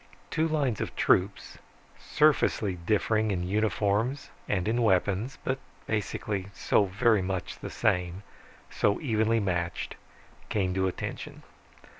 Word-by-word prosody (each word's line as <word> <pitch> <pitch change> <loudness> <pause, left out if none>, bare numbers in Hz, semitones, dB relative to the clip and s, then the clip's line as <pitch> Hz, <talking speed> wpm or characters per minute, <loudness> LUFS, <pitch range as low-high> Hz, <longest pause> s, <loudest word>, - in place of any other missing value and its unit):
Two 160 +1 +1
lines 140 -8 0
of - - -4
troops, 95 +2 +1 0.4
surfacely 150 -9 +2
differing 110 0 +2
in 90 -3 -1
uniforms 110 +5 0 0.2
and 95 -2 0
in 120 +2 +1
weapons, 105 +4 +1
but 130 0 -1 0.3
basically 105 -2 -2
so 105 - +3
very 105 +2 +3
the 95 -1 -4
same, 90 +1 0 0.5
so 100 - +1
evenly 115 -4 +2
matched, 90 -4 -2 0.6
came 95 -3 0
to 95 0 +1
attention. 95 - -5
105 Hz, 115 wpm, -28 LUFS, 95-115 Hz, 0.6 s, so